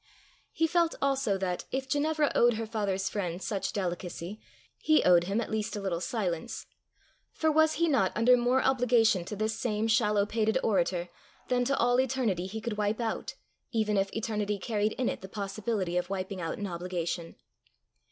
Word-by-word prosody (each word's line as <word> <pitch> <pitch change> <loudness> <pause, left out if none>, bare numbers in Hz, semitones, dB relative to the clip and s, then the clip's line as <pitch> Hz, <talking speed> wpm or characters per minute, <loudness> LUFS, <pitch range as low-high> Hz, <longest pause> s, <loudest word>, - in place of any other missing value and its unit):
He 325 - +1
felt 335 0 +2
also 270 -7 +1
that, 185 -2 -2
if 265 0 -2
Ginevra 295 +2 +1
owed 240 -1 +4
her 225 +1 -3
father's 200 -3 -1
friend 180 -4 -3
such 195 -1 -2
delicacy, 180 +1 -4 0.4
he 310 0 +3
owed 175 -1 +5
him 200 +4 0
at 235 - -3
least 215 -1 -2
a - - -3
little 185 -4 -2
silence; 180 -7 -3 0.7
for 315 -1 +1
was 315 +1 +4
he 335 +1 +1
not 245 - +2
under 235 +3 +5
more 250 +2 +2
obligation 240 -7 +3
to 210 - -5
this 215 +1 -1
same 220 -2 0
shallow 210 -2 +3
pated 220 +1 +1
orator, 180 -3 +1 0.4
than 250 -1 +2
to 275 +2 +1
all 245 +1 +3
eternity 235 -9 -1
he 220 +3 -5
could 220 -2 -4
wipe 210 +2 0
out, 230 -2 -3 0.4
even 215 -2 +1
if 195 0 +1
eternity 210 -2 -1
carried 210 +1 -1
in 255 - -1
it - - -2
the 190 - -9
possibility 200 -2 -2
of 180 0 -1
wiping 190 -1 -4
out 165 -1 -3
an 205 - -4
obligation? 175 -2 -4
215 Hz, 180 wpm, -29 LUFS, 190-245 Hz, 0.7 s, owed